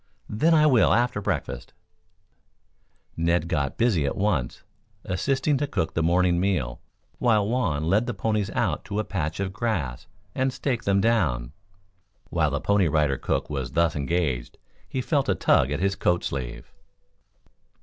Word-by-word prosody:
"Then, 160 +11 +3
I 155 -1 +5
will 130 -7 +5
after 120 -3 +1
breakfast." - - -3 1.4
Ned 85 0 +1
got 70 -6 -1
busy 110 -10 +2
at 70 - -2
once, 90 -12 -1 0.4
assisting 135 +9 0
to 145 - -1
cook 80 - -2
the 80 - 0
morning 85 +1 +2
meal, 85 -11 -1 0.4
while 110 -5 +3
Juan 105 - 0
led 100 +9 +2
the 120 - -3
ponies 105 0 -1
out - - 0
to 100 - -4
a 110 - +1
patch 80 -5 -3
of 95 -1 -2
grass 95 - -2 0.3
and 130 0 0
staked 125 -3 -2
them 100 0 +3
down. 80 - +1 0.8
While 80 -3 +2
the 70 0 -2
Pony 100 -3 +2
Rider 75 -3 +1
cook - - -1
was 70 -4 -4
thus 85 0 +2
engaged, 70 -3 -2 0.3
he 130 - -2
felt 140 +1 0
a - - +3
tug 65 - +3
at 75 +1 -2
his 95 +2 +1
coat 85 0 +1
sleeve. - - -5
90 Hz, 160 wpm, -25 LUFS, 75-115 Hz, 1.4 s, I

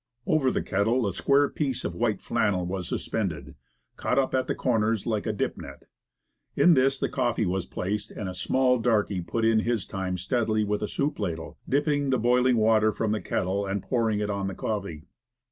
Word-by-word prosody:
Over 145 -4 +2
the - - -1
kettle 110 +5 +1
a 100 - 0
square 140 +6 +3
piece 135 -5 -2
of 85 - -2
white 110 +3 -1
flannel 100 -6 0
was 90 -1 -4
suspended, 80 -11 -3 0.4
caught 125 - -1
up 135 -1 +2
at 130 -1 +1
the - - -1
corners 115 -4 0
like 110 -2 -1
a - - +1
dip 105 - -2
net. - - -10 0.7
In 175 - +6
this 135 -1 +3
the - - 0
coffee 120 -4 0
was 95 0 -2
placed, 105 +3 -3
and 105 - -6
a 90 - -4
small 125 +6 +2
darky 105 -5 +1
put 115 +6 -2
in 115 -1 +4
his 115 -2 -1
time 95 -1 -3
steadily 110 +2 0
with 105 0 -1
a 105 - -1
soup 145 +7 -2
ladle, 85 -5 -4
dipping 145 0 +1
the 130 - +3
boiling 125 +1 +3
water 110 0 +4
from 110 0 -1
the 110 - -1
kettle 100 +2 -1
and 95 0 -2
pouring 110 0 0
it 105 0 -1
on 100 -1 -2
the 95 - -4
coffee. 100 -8 -4
110 Hz, 200 wpm, -26 LUFS, 95-125 Hz, 0.7 s, In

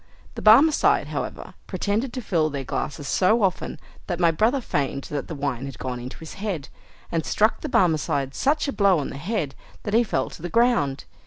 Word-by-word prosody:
The - - -7
Barmecide, 275 +9 +5
however, - - -5
pretended 210 +6 -1
to 255 - -4
fill 160 -6 +1
their 140 -2 -4
glasses 145 +2 -4
so 215 +4 +3
often, 185 -2 -1 0.3
that 175 - -2
my 170 -2 +4
brother 225 - +2
feigned 140 - -2
that 145 -1 -3
the 165 - -5
wine 140 -2 -3
had 135 - -8
gone 125 -1 -4
into 125 +2 -8
his 160 - -9
head, 185 -10 -3 0.4
and 165 -1 0
struck 215 +7 +2
the 305 - -4
Barmecide 150 - +1
such 290 +2 +1
a 280 - -2
blow 200 -3 +4
on 145 - -3
the - - -7
head, 160 -3 -2 0.3
that 210 - -4
he 235 +2 +5
fell 225 - -1
to - - -11
the 175 - -4
ground. 230 - +2
175 Hz, 200 wpm, -24 LUFS, 140-220 Hz, 0.4 s, Barmecide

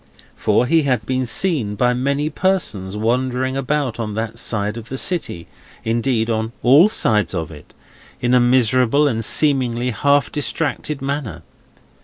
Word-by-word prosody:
For, 125 - +1
he 165 +5 +3
had 125 -7 -1
been 130 +1 -1
seen 120 - 0
by 125 +3 +2
many 140 +4 -1
persons, 110 - -1
wandering 125 +3 -1
about 135 -2 -2
on 105 -2 -4
that 115 +1 -4
side 105 -2 -1
of 115 -1 -9
the 135 - -4
city—indeed 115 - -2
on 110 0 -2
all 145 +11 +6
sides 105 - +1
of 85 -2 -4
it—in 120 +9 -7
a 125 - +6
miserable 125 +3 +3
and 115 -4 -1
seemingly 125 -2 +1
half 140 +5 +1
distracted 150 -1 -3
manner. 135 - -4
125 Hz, 140 wpm, -19 LUFS, 110-140 Hz, -, all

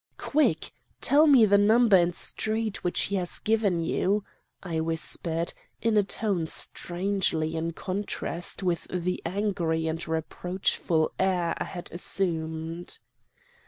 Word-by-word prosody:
"'Quick! 300 +1 +1 0.3
Tell 300 +3 +5
me 265 -6 +7
the 200 -1 +4
number 220 +1 +5
and 175 -1 +3
street 220 -1 -1
which 180 - +1
he 200 - 0
has 180 -2 -2
given 210 -6 +1
you! 195 +5 0 0.4
'I 165 -4 -2
whispered, 165 +1 -2 0.3
in 225 -1 +1
a 210 - +6
tone 195 -4 -1
strangely 175 -3 -1
in 165 +1 -2
contrast 185 -1 -3
with 175 -3 -1
the 180 0 -2
angry 175 -4 -1
and 165 +3 -3
reproachful 160 0 -1
air 180 -3 +1
I - - -4
had 175 -1 -8
assumed. 165 -1 -1
180 Hz, 125 wpm, -27 LUFS, 165-205 Hz, 0.4 s, me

